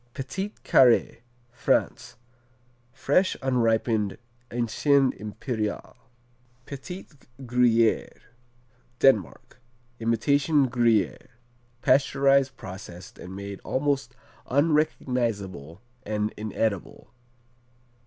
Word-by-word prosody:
Petit 190 +10 -4
Carré 125 -3 +4 0.3
France 120 - -1 0.8
Fresh, 145 +8 +1
unripened 115 -4 +1 0.3
Ancien 130 +3 +2
Impérial. 105 0 -5 0.7
Petit 160 +7 -8 0.3
Gruyère 120 -3 +2 0.8
Denmark 125 -3 +1 0.4
Imitation 140 +6 +2
Gruyère, 115 -6 +1 0.6
pasteurized, 135 0 +3
processed 90 -2 -10
and 90 +2 -9
made 100 0 -7
almost 135 -2 -1 0.3
unrecognizable 120 - -1 0.2
and 105 -1 -2
inedible. 105 -2 -3
120 Hz, 65 wpm, -26 LUFS, 105-135 Hz, 0.8 s, Carré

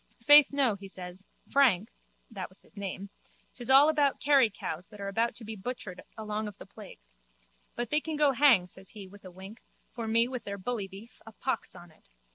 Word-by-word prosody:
Faith, 290 +2 +9
no, 275 -5 +2
he 200 0 -9
says, 185 0 -7 0.2
Frank 230 -6 +3 0.4
(that 195 -5 -6
was 185 - -14
his - - -23
name), 200 0 -6 0.4
'tis 245 -1 -6
all 270 +3 +8
about 290 -3 +2
Kerry 275 -5 +4
cows 180 -3 -6
that 210 - -15
are 200 0 -4 0.2
to 235 - -10
be 220 +1 -6
butchered 200 -3 -6 0.2
along 215 0 -4
of 205 -1 -9
the - - -11
plague. 200 0 -13 0.8
But 240 -1 -4
they 300 - +2
can 315 0 -5
go 295 -1 +4
hang, 260 -8 +5
says 190 +1 -10
he 205 -3 -10
with 200 +2 -16
a - - -8
wink, 190 +5 -12 0.3
for 230 -2 -5
me 230 +2 +3
with 250 -1 -6
their 200 0 -6
bully 205 0 -3
beef, 200 +5 -14
a - - -9
pox 260 +5 -4
on 175 -1 -13
it. 155 - -27
215 Hz, 210 wpm, -29 LUFS, 195-255 Hz, 0.8 s, Faith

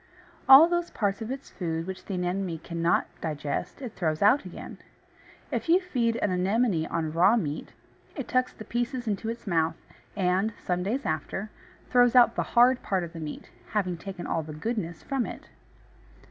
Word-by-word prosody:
All 275 +5 +11
those 345 0 -1
parts 200 -1 -1
of 220 - -4
its 270 +1 -6
food 165 -3 -3
which 190 0 -7
the 195 - -4
Anemone 180 -1 -2
cannot 170 +1 0 0.2
digest, 150 - -4
it 235 -4 -6
throws 160 -1 -1
out 235 +8 +5
again. - - -9 0.7
If - - -2
you 350 +3 +6
feed 245 -11 0
an 205 - 0
Anemone 185 -1 +1
on 160 -2 -2
raw 185 +7 +5
meat, 155 -8 -4 0.4
it 275 -6 -5
tucks 255 0 +1
the 215 - -11
pieces 240 +2 -2
into 215 +1 -2
its 235 +1 -6
mouth, 165 -4 +1 0.4
and, 190 +2 +1
some 180 0 -2
days 230 +9 -2
after, 160 +7 -3 0.4
throws 245 -1 +5
out 240 -2 +7
the - - +1 0.2
hard 250 +2 +6
part 190 -3 -1
of 170 0 -7
the 165 - -7
meat, 155 -2 -7 0.2
having 185 -4 0
taken 190 +1 -7
all 165 - -1
the 155 0 -8
"goodness" 175 -2 -3
from 270 -4 -1
it. - - -9
195 Hz, 180 wpm, -27 LUFS, 170-240 Hz, 0.7 s, All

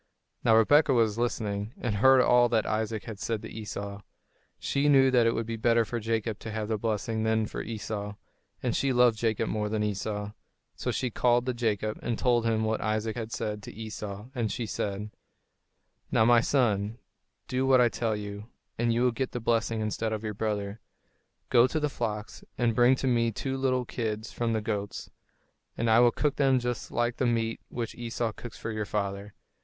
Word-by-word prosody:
Now 110 - +5
Rebekah 145 +4 +5
was 115 -2 +2
listening, 105 -2 -2
and 110 -4 -1
heard 130 +4 +6
all 120 -1 +5
that 115 -2 +2
Isaac 110 -1 -2
had 110 -3 -8
said 105 0 -2
to 110 - -8
Esau. 100 -2 -6 0.6
She 140 +1 0
knew 135 -2 +6
that 120 -2 +4
it 115 - +2
would 115 - -1
be 115 0 -4
better 115 0 +3
for 120 +2 -3
Jacob 110 -1 -2
to 110 - -7
have 110 0 -3
the 110 -2 0
blessing 110 0 -1
than 110 0 +1
for - - -5
Esau; 105 -2 -5 0.5
and - - 0
she 140 - +1
loved 120 -3 +4
Jacob 115 -1 0
more 105 -1 -1
than 105 0 0
Esau. 105 0 -3 0.4
So - - -3
she 125 - -1
called 120 +1 +2
to 130 - 0
Jacob 110 -3 -1
and 120 -2 -2
told 120 -2 +2
him 110 -1 +1
what 110 0 0
Isaac 110 0 -1
had 115 -2 -5
said 105 -2 -3
to - - -9
Esau, 105 0 -7
and 115 -4 -1
she 120 - -3
said: 105 0 -3 1.0
"Now, 110 - +4
my 120 0 +6
son, 110 -5 +1 0.5
do 130 +1 0
what 130 -1 +6
I 125 - +6
tell 110 +1 -1
you, 105 0 -6 0.3
and 120 0 +2
you 120 +2 +2
will 125 - +4
get 125 +3 -3
the 125 - -2
blessing 115 -1 0
instead 110 +1 -2
of 110 0 -3
your 105 -1 -3
brother. 105 0 -3 0.7
Go 120 0 +6
to 155 - -1
the 150 -1 0
flocks 110 -5 -4
and 120 -2 +2
bring 120 +3 +5
to 130 - -2
me 120 -2 +2
two 135 +5 -3
little 130 -2 0
kids 110 -2 -3
from 115 -1 -1
the 110 - 0
goats, 105 -2 -4 0.7
and 115 - 0
I 110 - +6
will 120 0 +7
cook 145 +4 -1
them 135 -2 +4
just 125 -1 -3
like 120 0 -1
the 130 - +1
meat 115 -1 0
which 115 -2 -4
Esau 120 -1 -3
cooks 120 +2 -10
for 115 - -5
your 110 -1 -2
father. 100 0 -3
115 Hz, 200 wpm, -28 LUFS, 105-120 Hz, 1.0 s, will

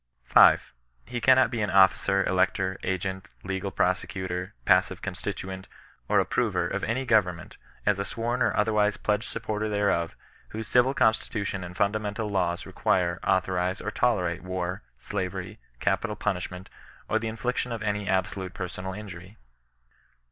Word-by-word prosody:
5. 60 - +6 0.3
He 120 - -4
cannot 130 +1 +5
be 115 - -2
an 105 - 0
officer, 95 0 +4
elector, 95 0 +1
agent, 95 0 -3
legal 95 0 -3
pro 90 - +3
secutor, 95 -1 -5
passive - - +3
constituent, 95 0 -5 0.4
or - - +4
approver - - +1
of - - -3
any 130 +4 -1
goyem 105 -8 +3
ment, - - -12 0.3
as 105 -1 +2
a - - 0
sworn 120 +5 -2
or - - +2
otherwise 105 -1 +2
pledged 105 +1 -1
supporter 110 -1 -3
tiiereof^ 100 -5 0 0.3
whose 110 0 -6
civil 125 +4 +3
constitution 105 -3 0
and 90 0 -8
mndamental 105 +1 -1
laws 90 -3 0
require, 85 -1 0
authorize, 95 0 +1
or 105 - -4
tolerate 90 -8 +1
war, 90 0 -3 0.2
slavery, 95 -3 -4 0.2
capital 105 -2 0
punishment^ 90 -2 -3 0.4
or 110 - +1
the 115 - -3
infliction 120 +2 -2
of 115 -2 -4
any 105 -1 -1
absolute 95 0 -1
persoiud 95 +1 -5
injury. 95 0 -10
100 Hz, 145 wpm, -27 LUFS, 95-110 Hz, 0.4 s, 5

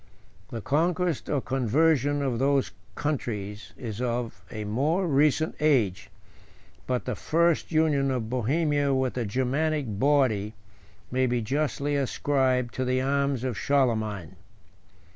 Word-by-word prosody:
The 115 - -5
conquest 170 - 0
or 145 -3 +1
conversion 145 +3 +2
of 125 -4 -1
those 135 0 +2 0.2
countries 105 -8 -3
is 115 -2 -5
of 120 -6 -3
a 110 -1 -5
more 145 - 0
recent 150 +1 +2
age; 115 -9 +2 0.8
but 125 -1 -1
the 125 - -2
first 170 +1 +1
union 155 -4 +2
of 125 -4 -1
Bohemia 140 +4 +1
with 130 -1 0
the 120 -2 -2
Germanic 135 +7 0
body 120 -7 +2 0.6
may 130 +1 +2
be 120 -1 0
justly 145 +3 -1
ascribed 130 -2 +1
to 130 - -2
the 130 0 +1
arms 140 -1 0
of 130 -3 -2
Charlemagne. 110 - 0
130 Hz, 125 wpm, -27 LUFS, 120-145 Hz, 0.8 s, conversion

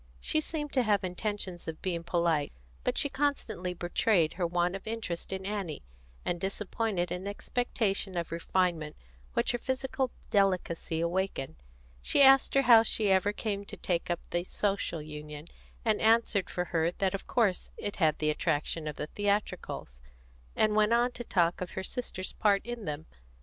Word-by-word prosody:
She 310 - 0
seemed 295 -2 -4
to 260 - +4
have 210 -4 +2
intentions 185 -1 -4
of 160 -1 -5
being 170 -3 -1
polite; 170 -4 +1 0.3
but - - 0
she - - +2
constantly 270 -11 -1
betrayed 175 -1 +2
her 175 -1 0
want 175 +1 +1
of 195 +3 -8
interest 220 -7 -4
in 190 0 -4
Annie, 195 -7 -3 0.4
and 175 -1 -1
disappointed 195 -2 -1
an 180 +2 -3
expectation 205 -3 -1
of 170 - -2
refinement 170 -2 0 0.4
which - - +2
her 240 - -2
physical 260 +1 -1 0.2
delicacy 180 -5 +1
awakened. 170 -4 -1 0.5
She 280 - +4
asked 270 0 +6
her 275 - +5
how 235 -2 +9
she 215 -2 +1
ever 190 +2 +4
came 205 -1 -3
to - - -8
take 175 -1 -1
up 175 - 0
the 175 0 0
Social 195 -4 -1
Union, 150 0 -8 0.4
and 215 -2 +2
answered 225 -4 +3
for 180 - -2
her 165 0 +3
that 190 0 0
of 195 - -5
course 210 -7 +1
it 205 - -4
had 160 -4 +3
the 155 0 +1
attraction 155 0 -1
of 150 - -3
the - - -3
theatricals, 200 - -2 0.5
and 215 -1 +3
went 215 +1 +4
on 240 +1 +3
to 240 - -7
talk 175 -6 +1
of 180 - -4
her 190 - -1
sister's 190 -3 -4
part 200 -2 +2
in 240 -3 -5
them. 150 +1 -4
190 Hz, 170 wpm, -30 LUFS, 170-215 Hz, 0.5 s, how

